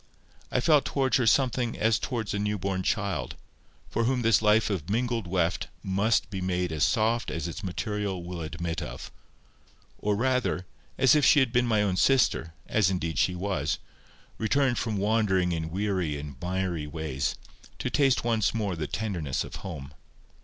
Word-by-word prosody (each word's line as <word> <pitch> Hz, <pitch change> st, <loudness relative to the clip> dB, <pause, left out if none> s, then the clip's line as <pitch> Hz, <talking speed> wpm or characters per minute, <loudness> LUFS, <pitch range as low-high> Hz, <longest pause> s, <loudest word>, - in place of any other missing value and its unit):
I 125 Hz, -, +1 dB
felt 150 Hz, 0 st, +4 dB
towards 135 Hz, -2 st, +1 dB
her 125 Hz, -3 st, +1 dB
somewhat 125 Hz, -2 st, +2 dB
as 110 Hz, 0 st, +2 dB
towards 115 Hz, -5 st, -3 dB
a 100 Hz, -, -1 dB
new 105 Hz, 0 st, 0 dB
born 95 Hz, -1 st, -2 dB
child, 95 Hz, -, -1 dB, 0.5 s
for 115 Hz, -, 0 dB
whom 125 Hz, 0 st, +1 dB
this 115 Hz, -2 st, +4 dB
life 105 Hz, 0 st, +3 dB
of 90 Hz, -4 st, -3 dB
mingled 115 Hz, -1 st, 0 dB
weft 85 Hz, -2 st, 0 dB, 0.2 s
must 100 Hz, +3 st, +1 dB
be 95 Hz, -2 st, -4 dB
made 90 Hz, -1 st, -1 dB
as 75 Hz, -2 st, 0 dB
soft 115 Hz, -, +2 dB
as 80 Hz, +2 st, -3 dB
its 85 Hz, -, -6 dB
material 100 Hz, 0 st, -3 dB
will 85 Hz, -1 st, -6 dB
admit 85 Hz, +1 st, -4 dB
of; -, -, -7 dB, 0.9 s
or 105 Hz, 0 st, 0 dB
rather, 125 Hz, -5 st, 0 dB, 0.3 s
as 130 Hz, -, +5 dB
if 150 Hz, -1 st, +4 dB
she 145 Hz, -, +6 dB
had 130 Hz, -4 st, +1 dB
been 125 Hz, 0 st, +3 dB
my 110 Hz, -3 st, +3 dB
own 95 Hz, -3 st, 0 dB
sister, 105 Hz, -12 st, +2 dB
as -, -, +2 dB
indeed 85 Hz, -6 st, -2 dB
she 90 Hz, +4 st, +2 dB
was, 90 Hz, -6 st, -1 dB, 0.6 s
returned 130 Hz, +2 st, +2 dB
from 110 Hz, -3 st, -2 dB
wandering 100 Hz, -3 st, +2 dB
in 80 Hz, -1 st, -2 dB
weary 90 Hz, -4 st, -1 dB
and 70 Hz, -1 st, -7 dB
miry 90 Hz, -4 st, -2 dB
ways, 75 Hz, -3 st, -2 dB, 0.4 s
to 125 Hz, -, -3 dB
taste 135 Hz, -1 st, +3 dB
once 115 Hz, -3 st, +1 dB
more 105 Hz, -5 st, -1 dB
the 80 Hz, -2 st, -3 dB
tenderness 90 Hz, -10 st, -2 dB
of -, -, -8 dB
home. 70 Hz, -7 st, -7 dB
100 Hz, 175 wpm, -27 LUFS, 85-115 Hz, 0.9 s, she